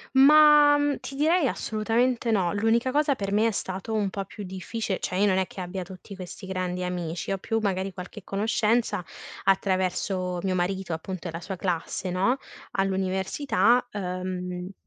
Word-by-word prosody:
Ma, 295 +1 +8
mhmm, 290 -1 +1
ti 275 - -7
direi 310 +2 +3
assolutamente 230 +3 0
no. 185 -5 +2
L'unica 225 +4 +2
cosa 290 +1 +2
per 200 -5 -4
me 215 +2 +3
è - - +3
stato 195 +1 -4
un 205 -3 +1
po' 195 0 -4
più 205 - -8
difficile. 190 +2 -4
Cioè. 180 - -3
io 200 - +3
non 190 -2 +3
è 190 - +1
che 185 - -7
abbia 185 +1 -4
tutti 190 +2 -11
questi 185 0 -9
grandi 180 -1 -2
amici, 175 0 -3
ho 195 - -1
più 225 +3 -1
magari 190 -1 -1
qualche 185 +3 -8
conoscenza 215 +1 +1 0.4
attraverso 185 -1 0
mio 190 -1 0
marito, 185 0 -1
appunto, 175 +2 -5
e - - -3
la 165 +1 -6
sua 190 +2 -5
classe, 180 +1 -2
no, 195 +9 +2 0.4
all'università, 195 +5 +1
uhm 180 -1 -4
195 Hz, 170 wpm, -26 LUFS, 185-225 Hz, 0.4 s, Ma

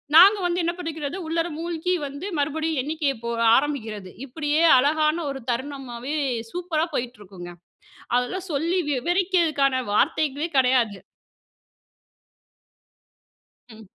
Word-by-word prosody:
நாங்க 395 +5 +9
வந்து 350 0 0
என்ன 340 - +1
பண்ணிக்கிறது, 320 -2 -4
உள்ளார 330 +1 0
மூழ்கி 340 +1 -2
வந்து 285 +6 -8
மறுபடியும் 315 +1 -1
எண்ணிக்கைய 300 0 -1
போக 235 0 -2 0.2
ஆரம்பிக்கிறது. 225 -9 -2 0.2
இப்படியே 295 +3 -1 0.2
அழகான 305 +4 +2
ஒரு 275 -1 -5
தருணமாவே 260 +1 -5 0.4
சூப்பரா 345 -3 -1
போயிட்டு 245 -1 -3
இருக்கும்ங்க. 180 -3 -10 0.6
அதெல்லாம் 360 +10 -2
சொல்லி 330 +6 0
விவரிக்கதுக்கான 310 -3 +1
வார்த்தைகளே 295 +7 +1
கெடையாது. 250 -6 +2 2.7
ம். 220 -1 -13
295 Hz, 105 wpm, -24 LUFS, 255-330 Hz, 2.7 s, நாங்க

